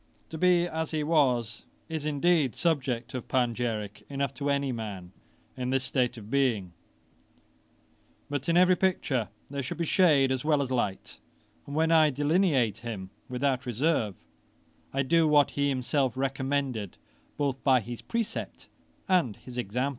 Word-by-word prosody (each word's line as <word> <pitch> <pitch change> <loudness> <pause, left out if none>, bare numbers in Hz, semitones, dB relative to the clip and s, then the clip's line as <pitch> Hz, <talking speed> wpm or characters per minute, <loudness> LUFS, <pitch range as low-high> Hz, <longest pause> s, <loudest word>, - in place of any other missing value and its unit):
To 160 - -5
be 175 0 +4
as 160 -1 -3
he 155 -2 -1
was, 125 -8 +1 0.3
is 160 -2 -3
indeed 150 -2 +2
subject 130 -8 -1
of 125 - -5
panegyrick 115 -4 -1
enough 140 -1 -2
to 140 +2 -3
any 140 -1 +1
man 100 -6 -6 0.4
in 125 0 -3
this 135 0 +1
state 125 -2 0
of 110 0 -10
being; 115 -10 +1 1.5
but 145 +2 -3
in 170 - +3
every 185 0 +6
picture 160 - 0 0.2
there 140 0 -2
should 125 - -5
be 170 - -1
shade 150 -7 +4
as 130 -1 -1
well 150 -2 +2
as 130 - -6
light, 105 -6 -2 0.5
and 140 - -6
when 160 +1 +2
I 160 -2 +6
delineate 145 - +2
him 105 -5 -6 0.2
without 130 +1 -1
reserve, 120 - 0 0.8
I 135 +1 0
do 165 +3 +3
what 145 -1 +4
he 140 0 0
himself 130 -1 0
recommended, 135 -5 -2 0.4
both 140 -2 -1
by 130 -2 +5
his 120 +1 -7
precept 230 -2 -4 0.4
and 175 - +2
his 125 - -12
example. 125 +3 -1
135 Hz, 155 wpm, -28 LUFS, 120-155 Hz, 1.5 s, every